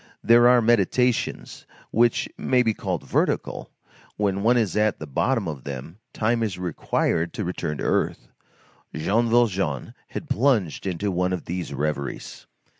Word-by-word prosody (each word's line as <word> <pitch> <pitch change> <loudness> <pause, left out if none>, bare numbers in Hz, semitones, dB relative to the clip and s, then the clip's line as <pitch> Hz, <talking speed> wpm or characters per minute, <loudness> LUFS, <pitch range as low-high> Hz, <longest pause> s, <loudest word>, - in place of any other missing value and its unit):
There 120 +1 +6
are 125 -1 +5
meditations 120 +2 +1 0.2
which 120 +1 +2
may 125 -1 +2
be 110 -2 +1
called 95 -6 -4
vertical; - - -1 0.5
when 100 -2 0
one 120 +4 +4
is 110 -6 0
at 105 -1 +2
the 75 - -7
bottom 115 - 0
of 75 -5 -6
them, 70 +7 -7
time 115 +2 0
is 105 -5 -2
required 85 -1 -1
to 105 - -3
return 85 -4 -3
to - - -5
earth. - - 0 0.7
Jean 110 +9 +1
Valjean 100 - +1
had - - -7
plunged 110 - +1
into 95 +2 -1
one 90 +1 0
of 90 - -4
these 90 -2 -4
reveries. 70 0 -4
100 Hz, 150 wpm, -24 LUFS, 85-115 Hz, 0.7 s, There